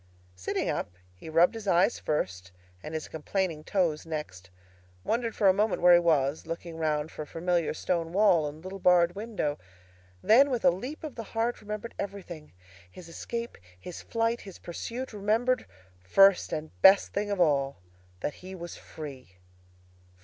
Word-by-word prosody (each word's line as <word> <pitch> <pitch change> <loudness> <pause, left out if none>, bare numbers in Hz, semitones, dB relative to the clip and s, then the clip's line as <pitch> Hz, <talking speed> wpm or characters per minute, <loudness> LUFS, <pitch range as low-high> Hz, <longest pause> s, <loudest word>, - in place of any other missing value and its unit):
Sitting 90 0 -2
up, 90 - -3 0.2
he 90 - -11
rubbed 165 +5 +4
his 225 -2 -7
eyes 190 +4 +3
first 95 - -2 0.3
and 155 - -7
his 155 - -4
complaining 160 0 -2
toes 170 -6 0
next, 150 - -6 0.5
wondered 230 - -1
for 205 - +3
a 190 - +7
moment 210 +1 +1
where 180 0 +8
he 175 - +8
was, 155 -3 +1
looking 165 0 -6
round 155 -1 -1
for 155 - -6
familiar 170 +2 -1
stone 165 0 -2
wall 180 -5 +4
and 150 +2 -9
little 190 +1 -7
barred 175 -1 +4
window; 200 -8 -3 0.6
then, 265 +6 +6
with 245 -3 -1
a - - +7
leap 250 - -6
of 305 -4 -5
the 230 - -6 0.2
heart, 235 +2 0
remembered 210 +2 -6
everything—his 150 - -9
escape, 235 +7 -6 0.2
his 170 - -8
flight, 230 +1 -1
his 195 -3 -11
pursuit; 235 +9 -6
remembered, 220 +5 +1 0.3
first 195 - +5
and 155 0 -4
best 195 +1 +6
thing 205 +1 -1
of 200 -2 -2
all, 140 -5 +2 0.4
that 150 - -2
he 185 +1 -8
was 175 -1 -7
free! 130 - -10
175 Hz, 160 wpm, -28 LUFS, 155-205 Hz, 0.6 s, where